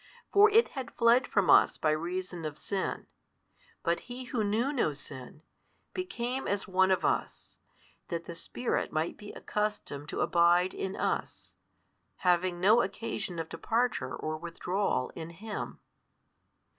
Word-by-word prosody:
For 410 +1 +8
It 455 +3 +5
had 260 -4 -7
fled 235 +2 +5
from 200 -3 +2
us - - +6
by 155 - +2
reason 175 +2 -3
of 150 -1 -4
sin, 195 -2 -3 0.8
but 170 0 +1
He 250 +1 -5
Who 245 -3 -1
knew 225 +7 +1
no 195 - +1
sin, 145 +1 -9 0.5
became 265 -8 -3
as 200 0 -1
one 190 0 +3
of 190 - +2
us, - - -2 0.5
that 170 -1 -4
the 170 - -6
Spirit 245 +8 -2
might 160 +1 -1
be 205 -1 -10
accustomed 210 -9 -3
to - - -2
abide 175 +1 +4
in 190 - -3
us, - - -3 0.7
having 180 0 +3
no 215 +6 +6
occasion 195 -4 -3
of 165 -1 -3
departure 225 - -1
or 155 0 -3
withdrawal 170 -1 -1
in 165 -1 -6
Him. 205 +6 -6
190 Hz, 145 wpm, -30 LUFS, 170-230 Hz, 0.8 s, For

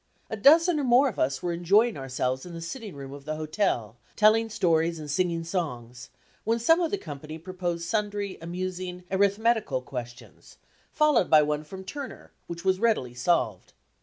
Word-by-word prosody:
A - - -1
dozen 315 - +5
or - - -1
more 255 +2 +5
of 220 - -8
us 135 +2 0
were 175 -1 -1
enjoying 200 +7 +3
ourselves 130 -1 -2
in 175 - -9
the - - -6
sitting 205 - -7
room 135 -1 -8
of 140 -1 -11
the 155 0 -3
hotel, 155 - -1 0.2
telling 220 +1 +4
stories 165 -4 +1
and 150 -2 -6
singing 170 +1 0
songs, 125 -8 -4 0.3
when 225 +2 +1
some 325 +9 +4
of 335 - +1
the 405 - -1
company 155 - -8
proposed 175 0 -4
sundry 205 -1 -2
amusing 180 +1 -5
arithmetical 200 - +2
questions, 120 -1 -9 0.3
followed 300 - +3
by 155 -1 +7
one 150 0 -1
from 190 +5 -9
Turner, 270 +6 -8 0.2
which 170 +2 -7
was 190 0 +2
readily 215 - +1
solved. 120 - 0
180 Hz, 170 wpm, -27 LUFS, 150-215 Hz, 0.3 s, by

